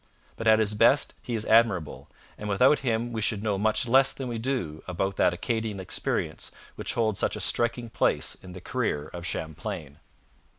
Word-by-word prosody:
But 115 Hz, -, -4 dB
at 110 Hz, 0 st, +7 dB
his 105 Hz, -1 st, +2 dB
best 115 Hz, +7 st, +4 dB
he 120 Hz, -, -4 dB
is 110 Hz, -, -2 dB
admirable, 110 Hz, -9 st, +2 dB, 0.3 s
and 105 Hz, -, -6 dB
without 125 Hz, +9 st, +4 dB
him 120 Hz, -1 st, -1 dB
we 110 Hz, -, -2 dB
should 105 Hz, -1 st, 0 dB
know 105 Hz, -3 st, 0 dB
much 110 Hz, +3 st, +1 dB
less 135 Hz, +3 st, +5 dB
than 135 Hz, -, -6 dB
we 115 Hz, -1 st, -3 dB
do 110 Hz, -, -2 dB
about 95 Hz, +2 st, -2 dB
that -, -, +4 dB
Acadian 110 Hz, +3 st, -2 dB
experience 95 Hz, -, -2 dB, 0.2 s
which -, -, -4 dB
holds 110 Hz, -4 st, +1 dB
such -, -, 0 dB
a -, -, -5 dB
striking 120 Hz, 0 st, +1 dB
place 115 Hz, -, +1 dB
in 90 Hz, -1 st, -12 dB
the 90 Hz, -, -9 dB
career 90 Hz, -, -2 dB
of 85 Hz, 0 st, -5 dB
Champlain. 80 Hz, -2 st, -5 dB
110 Hz, 185 wpm, -27 LUFS, 95-115 Hz, 0.3 s, at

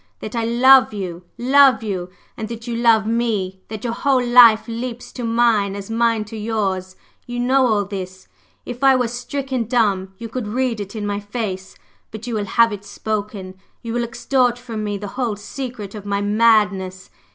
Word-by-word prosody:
That 215 Hz, -, -7 dB
I 230 Hz, -, 0 dB
love 245 Hz, 0 st, +5 dB
you, 180 Hz, -3 st, -6 dB
love 260 Hz, 0 st, +5 dB
you! 185 Hz, -4 st, -3 dB, 0.3 s
And 220 Hz, -, -5 dB
that 230 Hz, 0 st, -7 dB
you 240 Hz, -1 st, -3 dB
love 230 Hz, -2 st, +3 dB
me! 215 Hz, -5 st, -1 dB
That 215 Hz, -1 st, -7 dB
your 235 Hz, -2 st, -2 dB
whole 255 Hz, 0 st, +1 dB
life 240 Hz, -2 st, +7 dB
leaps 235 Hz, +1 st, -6 dB
to 245 Hz, -, -7 dB
mine 225 Hz, -4 st, +2 dB
as 200 Hz, +2 st, -7 dB
mine 230 Hz, -1 st, +1 dB
to 220 Hz, +2 st, -10 dB
yours! 195 Hz, -4 st, -2 dB, 0.3 s
You 245 Hz, 0 st, -4 dB
know 260 Hz, +1 st, +3 dB
all 210 Hz, -3 st, +1 dB
this; 185 Hz, -1 st, -7 dB, 0.4 s
if 245 Hz, +2 st, -7 dB
I 270 Hz, -1 st, +6 dB
were 250 Hz, -2 st, +1 dB
stricken 255 Hz, +1 st, -3 dB
dumb, 200 Hz, -5 st, 0 dB
you 230 Hz, -, -7 dB
could 225 Hz, 0 st, -5 dB
read 240 Hz, 0 st, -1 dB
it 200 Hz, +1 st, -7 dB
in 210 Hz, -1 st, -4 dB
my 205 Hz, 0 st, -2 dB
face, 205 Hz, -3 st, -5 dB, 0.3 s
but 220 Hz, +1 st, -8 dB
you 240 Hz, -, -4 dB
will 210 Hz, -2 st, -1 dB
have 230 Hz, +2 st, +3 dB
it 200 Hz, -1 st, -7 dB
spoken 205 Hz, -3 st, -4 dB, 0.3 s
you 230 Hz, -1 st, -4 dB
will 240 Hz, 0 st, 0 dB
extort 245 Hz, +1 st, 0 dB
from 230 Hz, -3 st, -6 dB
me 205 Hz, -1 st, -2 dB
the 205 Hz, 0 st, -6 dB
whole 230 Hz, -4 st, 0 dB
secret 220 Hz, -1 st, -7 dB
of 210 Hz, -2 st, -8 dB
my 200 Hz, 0 st, 0 dB
madness! 205 Hz, -3 st, +2 dB
225 Hz, 190 wpm, -20 LUFS, 205-240 Hz, 0.4 s, life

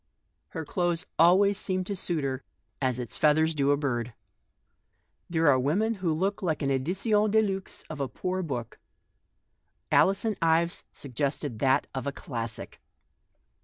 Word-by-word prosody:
Her 160 Hz, -, -6 dB
clothes 175 Hz, +1 st, 0 dB
always 190 Hz, +4 st, +5 dB
seemed 185 Hz, -1 st, 0 dB
to 200 Hz, -, -3 dB
suit 170 Hz, -4 st, -1 dB
her 130 Hz, -1 st, -2 dB, 0.4 s
as 130 Hz, -2 st, +1 dB
its 125 Hz, -3 st, -4 dB
feathers 155 Hz, +1 st, +4 dB
do 140 Hz, -2 st, +1 dB
a 145 Hz, -, +4 dB
bird. 120 Hz, -5 st, -2 dB, 1.1 s
There 165 Hz, -2 st, +2 dB
are 135 Hz, -3 st, +5 dB
women 190 Hz, -, +1 dB
who 170 Hz, -3 st, +1 dB
look 190 Hz, +7 st, -1 dB
like 160 Hz, -5 st, -1 dB
an 140 Hz, -, +1 dB
edition 180 Hz, -, -1 dB, 0.2 s
de 220 Hz, +2 st, +4 dB
huve 195 Hz, -3 st, -2 dB
of 155 Hz, -2 st, -7 dB
a 140 Hz, -, -1 dB
poor 185 Hz, +9 st, -3 dB
book; 125 Hz, -9 st, -5 dB, 1.1 s
Alison 195 Hz, +2 st, +3 dB
Ives 165 Hz, +1 st, +2 dB
sug 140 Hz, -3 st, -10 dB
gested 140 Hz, -2 st, -2 dB
that 135 Hz, +2 st, +3 dB
of 130 Hz, 0 st, -4 dB
a -, -, 0 dB
classic. 115 Hz, -7 st, -6 dB
155 Hz, 155 wpm, -28 LUFS, 135-185 Hz, 1.1 s, always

